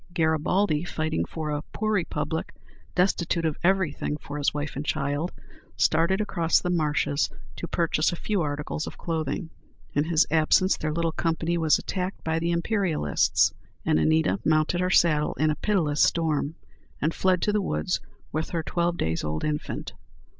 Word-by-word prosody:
Garibaldi, 160 +1 +2
fighting 155 - -1
for 155 - -4
a 145 0 -1
poor 215 0 -1
republic, 160 -4 -2 0.4
destitute 175 -2 +1
of 155 -2 -1
everything 175 -5 +1
for 145 0 -7
his 145 - +2
wife 145 0 -4
and 140 - -3
child, 145 +3 -1 0.5
started 180 +4 +3
across 170 -6 +2
the 180 - -2
marshes 150 -3 +1 0.3
to 170 - -5
purchase 165 -1 +1
a - - -3
few 200 +2 -1
articles 150 0 -3
of - - -8
clothing. 160 +1 -3 0.4
In 145 +1 +2
his 165 0 +3
absence, 165 +4 +4
their 155 - -2
little 165 +1 0
company 165 +1 -1
was 160 -2 +4
attacked 185 0 -4
by 160 0 0
the 170 +1 -1
Imperialists, 170 - +2 0.3
and 80 - +3
Anita 80 +5 +2
mounted 155 +3 +2
her 180 - +1
saddle 155 -5 +3
in 155 +1 +2
a - - -1
pitiless 165 -9 +1
storm, 160 -2 +2 0.4
and 155 +3 0
fled 185 -1 +2
to 210 - +1
the 210 - +2
woods 185 -1 -1 0.3
with 155 +1 -2
her 165 -2 -2
twelve 175 +1 0
days 80 +1 -1
old 75 +1 -3
infant. 150 -1 -3
160 Hz, 165 wpm, -26 LUFS, 150-175 Hz, 0.5 s, absence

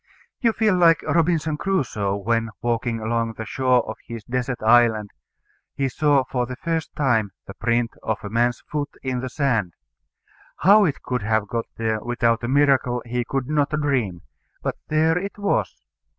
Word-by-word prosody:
You 230 -3 +3
feel 215 -3 +2
like 170 -2 +4
Robinson 160 -2 +1
Crusoe 120 - -1
when, 115 +3 0
walking 120 -1 -1
along 115 +1 -1
the 110 0 -6
shore 125 +1 +1
of 110 - -5
his 115 -2 -7
desert 125 +2 -2
island, 110 -2 +4 0.6
he 135 -1 0
saw 145 0 +2
for 125 -1 -2
the 125 - -5
first 165 +2 -3
time 115 -9 +1
the 100 - -9
print 115 +1 0
of 110 -1 -1
a 105 - -5
man's 120 +2 +1
foot 150 -1 -4
in 130 -2 -1
the 130 +1 -4
sand. 115 - 0 0.8
How 205 +3 +6
it 145 -5 -2
could 125 -2 -2
have 110 0 0
got 115 +2 -2
there 110 -1 -1
without 120 -1 +1
a - - -1
miracle 130 -3 +2
he 120 +1 -2
could 135 +1 -3
not 150 -1 +1
dream. 125 - -1 0.4
But - - -2
there 160 +2 +2
it 200 +3 -6
was. 105 - -1
125 Hz, 170 wpm, -23 LUFS, 115-145 Hz, 0.8 s, How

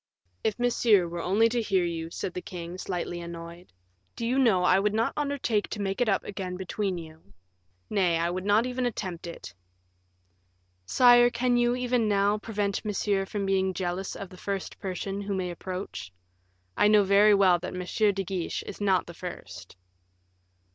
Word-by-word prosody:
"If 220 - 0
Monsieur 230 -6 +3
were 170 0 -5
only 205 +6 +3
to 240 +1 0
hear 195 -5 +1
you," 165 -1 -4
said 175 - -5
the 180 - -4
king, 175 0 -7
slightly 175 -2 -4
annoyed, 170 +1 -9 0.4
"do 230 - -4
you 255 +3 +1
know 215 -9 +4
I 185 +1 +5
would 210 +1 0
not 225 +1 +1
undertake 280 -8 -1
to 215 - -5
make 195 +3 -2
it 240 - +3
up 195 - +1
again 185 -2 -5
between 190 0 -2
you; 160 -10 -12 0.5
nay, 180 -5 +2
I 170 +1 0
would 185 +1 -3
not 205 +4 +3
even 250 0 -1
attempt 185 -7 -5
it." 170 - -9 1.3
"Sire, 245 - +6
can 245 0 +1
you, 240 0 +3
even 250 -3 0
now, 205 +1 +2
prevent 205 -2 -2
Monsieur 200 -2 0
from 200 -1 -3
being 190 -1 +1
jealous 180 +1 -3
of 195 - -7
the 185 - -13
first 195 0 -4
person 195 +1 -4
who 200 0 -3
may 180 -2 -2
approach? 180 - -6 0.6
I - - +4
know 210 -1 +6
very 200 +2 +5
well 185 -3 +4
that 180 +1 -6
M. 200 +3 +1
de 195 0 -2
Guiche 185 -2 -3
is - - -9
not 190 -2 +2
the 170 - -10
first." 95 - -9
195 Hz, 180 wpm, -27 LUFS, 180-215 Hz, 1.3 s, Sire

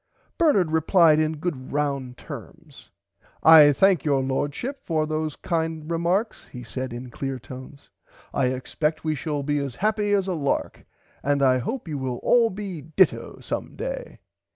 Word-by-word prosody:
Bernard 205 - +3
replied 160 0 +4
in 155 0 0
good 145 -5 -4
round 140 -3 -2
terms. - - -11 0.5
I 155 -2 +9
thank 185 +1 +3
your 140 -3 +1
lordship 145 - -3
for 155 -2 0
those 155 0 -2
kind 160 -1 -3
remarks 175 +7 -1
he 125 -1 -9
said 130 +4 -5
in 120 +1 -7
clear 135 +1 -4
tones 130 +3 -12 0.4
I 135 - +2
expect 150 +5 -2
we 155 -1 0
shall 145 0 -3
be 145 +1 0
as 140 -3 -4
happy 210 - 0
as 195 -2 +2
a 190 - -2
lark 145 -5 -2 0.4
and 140 0 +1
I 130 -1 +4
hope 230 - -4
you 150 -3 -4
will 130 -2 -3
all 235 -2 +4
be 190 -5 -6
ditto 160 +6 +1
some - - -5
day. - - -5
155 Hz, 160 wpm, -24 LUFS, 135-180 Hz, 0.5 s, I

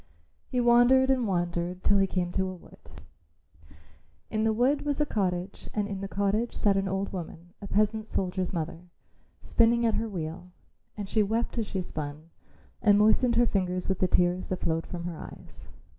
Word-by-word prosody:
He 250 - -1
wandered 245 +2 +5
and 255 -4 +1
wandered 175 0 -2
till 200 -1 +4
he 195 - +3
came 180 -2 -1
to 190 +1 -1
a 185 - -6
wood. 175 - -16 1.3
In 215 0 0
the 225 - +3
wood 255 +6 +2
was 290 -1 -1
a 300 - +3
cottage 185 -5 -2
and 210 -1 0
in 195 -2 -5
the 195 - -3
cottage 200 +4 -1
sat 200 -2 +2
an 195 0 0
old 195 +1 -2
woman, 175 -1 -7
a 200 - -7
peasant 215 +2 +1
soldier's 185 -2 -2
mother, 170 0 -5 0.6
spinning 235 0 +3
at 225 - +2
her 225 +1 -1
wheel, 175 -1 -6 0.5
and 205 -2 -4
she 215 - +2
wept 225 +3 -1
as 220 - -2
she 190 -2 -3
spun 155 0 -7 0.5
and 205 -2 +5
moistened 220 +3 +4
her 240 +1 +5
fingers 185 -4 -1
with 190 - 0
the 185 - +3
tears 180 +1 +2
that 185 - -3
flowed 165 -1 -1
from 175 -1 -6
her 170 -2 -5
eyes. - - -10
195 Hz, 190 wpm, -28 LUFS, 180-225 Hz, 1.3 s, wandered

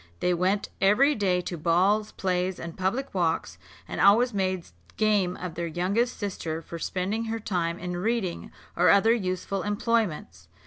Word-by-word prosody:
They 180 - +1
went 185 +4 0
every 235 +10 +5
day 190 -6 +1
to 175 -1 -6
balls, 190 +6 +2
plays, 185 -1 -1
and 170 -1 -7
public 195 +9 -2
walks, 165 - -1 0.3
and - - -3
always 230 +5 +5
made 185 -3 -1 0.3
game 205 -4 +2
of 180 -2 -6
their 170 +1 -3
youngest 195 +9 0
sister 175 -6 -4
for 165 +1 -8
spending 195 +7 -2
her 225 0 -3
time 175 -6 -2
in 180 0 -5
reading, 195 -1 -2 0.2
or 175 0 +4
other 200 +6 +5
useful 190 -2 -2
employments. 205 - -1
185 Hz, 160 wpm, -26 LUFS, 175-210 Hz, 0.3 s, every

